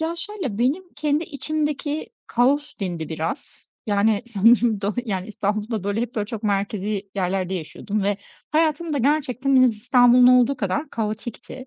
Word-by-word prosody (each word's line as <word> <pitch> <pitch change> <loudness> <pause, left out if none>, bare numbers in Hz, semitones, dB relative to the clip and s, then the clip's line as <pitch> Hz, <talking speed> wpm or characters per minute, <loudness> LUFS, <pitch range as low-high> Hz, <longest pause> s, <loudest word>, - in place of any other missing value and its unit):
Ya, 325 +1 -1
şöyle, 340 - -5
benim 275 +10 +1
kendi 300 +2 0
içimdeki 300 0 -3 0.2
kaos 275 +5 +1
dindi 175 -5 -3
biraz. 160 +1 -5 0.2
Yani, 205 +1 +2
sanırım 230 0 +3
do 200 0 0
yani, 190 -4 -3
İstanbul'da, 210 0 -2
böyle, 205 +2 -1
hep, 240 0 -3
böyle, 210 -2 -1
çok 220 -1 -6
merkezi 200 0 -2
yerlerde 190 -1 -1
yaşıyordum 200 +5 -4
ve 200 +1 +1 0.3
hayatım 315 +1 +1
da 285 - 0
gerçekten 275 -1 +1
en 255 - +7
az 240 -4 +4
İstanbul'un 245 +2 +5
olduğu 250 +2 +5
kadar 255 +8 -2
kaotikti. 230 +4 -5
235 Hz, 155 wpm, -23 LUFS, 205-280 Hz, 0.3 s, en